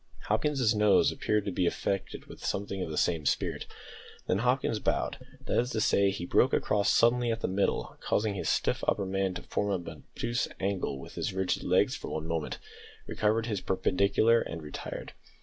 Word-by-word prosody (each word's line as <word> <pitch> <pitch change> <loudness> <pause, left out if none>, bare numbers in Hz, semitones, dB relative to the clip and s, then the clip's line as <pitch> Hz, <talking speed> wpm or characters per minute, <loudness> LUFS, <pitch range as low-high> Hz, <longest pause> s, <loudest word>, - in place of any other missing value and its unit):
Hopkins's 125 0 +2
nose 105 -1 +4
appeared 105 -1 0
to 100 - -1
be 90 0 +1
affected 100 +2 -2
with - - -12
something 100 -1 -2
of 85 - -3
the 75 - -4
same 85 -3 +1
spirit. 70 - -1 0.6
Then 95 - +1
Hopkins 125 -2 +1
bowed - - -1 0.3
that - - +1
is 125 +1 0
to 110 - 0
say, 100 -2 +3
he 95 -3 -4
broke - - +3
across 100 -2 +2
suddenly 120 0 +3
at 115 0 -3
the - - 0
middle, 100 +1 -1
causing 105 0 0
his 100 - -2
stiff - - 0
upper 100 - +1
man 95 -1 -1
to - - -6
form 100 -4 -2
an - - -9
obtuse 120 +1 -1
angle 95 -7 -1
with 70 - -10
his - - -3
rigid 95 -1 0
legs - - +2
for - - -7
one 80 0 -3
moment, 80 -2 -2 0.5
recovered 110 +2 +1
his 105 -5 -2
perpendicular 100 +5 +3
and 80 -1 -6
retired. 75 - -7
100 Hz, 185 wpm, -29 LUFS, 95-110 Hz, 0.6 s, nose